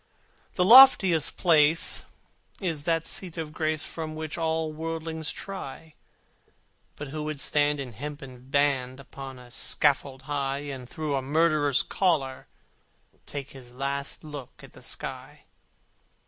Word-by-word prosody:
The 180 - +2
loftiest 205 - +8
place 160 -2 +3 0.5
is 165 -7 -3
the 165 -1 +2
seat 180 -1 -2
of 155 -2 -5
grace 155 -1 -1
For 160 -1 -5
which 155 -1 -5
all 160 -1 -1
worldlings 160 0 -4
try: 160 -5 -7 1.0
But 145 -1 -7
who 155 +2 -5
would 155 -2 -4
stand 145 0 +1
in 130 -3 -5
hempen 135 0 -9
band 135 -2 +1
Upon 135 0 -9
a 125 -1 -14
scaffold 135 0 +1
high, 140 -1 -2
And 125 -2 -9
through 155 -2 -3
a 135 - 0
murderer's 145 -1 +2
collar 145 -9 0 0.8
take 140 -1 -6
His 125 -3 -11
last 140 +2 -2
look 145 -5 -10
at - - -14
the - - -15
sky? - - -6
150 Hz, 135 wpm, -27 LUFS, 135-160 Hz, 1.0 s, loftiest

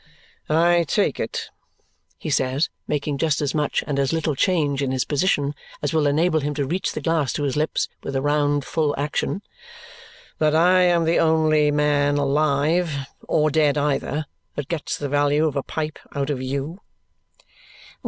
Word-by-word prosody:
"I 170 +2 +3
take - - +1
it," - - -4 0.7
he - - -5
says, 130 +4 +1 0.2
making 145 -1 -2
just 155 -3 +1
as 145 -3 -1
much 150 -1 0
and 140 -1 -2
as 135 -1 +1
little 160 -2 0
change 145 -2 +1
in 135 - 0
his 130 -1 0
position 145 -2 +1 0.3
as 145 - -1
will 155 -2 +2
enable 160 +3 +2
him 145 0 -3
to 140 -1 -1
reach 175 +7 -2
the - - -4
glass 160 -5 +1
to 145 - -2
his 140 -3 -1
lips 155 +1 0
with 135 - -5
a 135 - +1
round, 145 -1 +1
full 155 -3 0
action, 150 +7 -2 1.0
"that 155 0 +3
I 180 +3 +5
am 175 -2 +3
the 165 +1 +2
only 155 -2 +3
man 145 -1 +2
alive 150 +3 +1 0.3
(or 155 0 +2
dead 150 -1 +2
either) 145 +1 -1 0.3
that 145 -2 -5
gets 165 -3 -3
the 145 - -3
value 145 +2 +2
of 150 -3 -1
a 140 - 0
pipe 155 +2 -4 0.2
out 140 +1 -1
of 130 -3 -3
YOU?" 140 +8 -4
150 Hz, 175 wpm, -23 LUFS, 140-160 Hz, 1.0 s, I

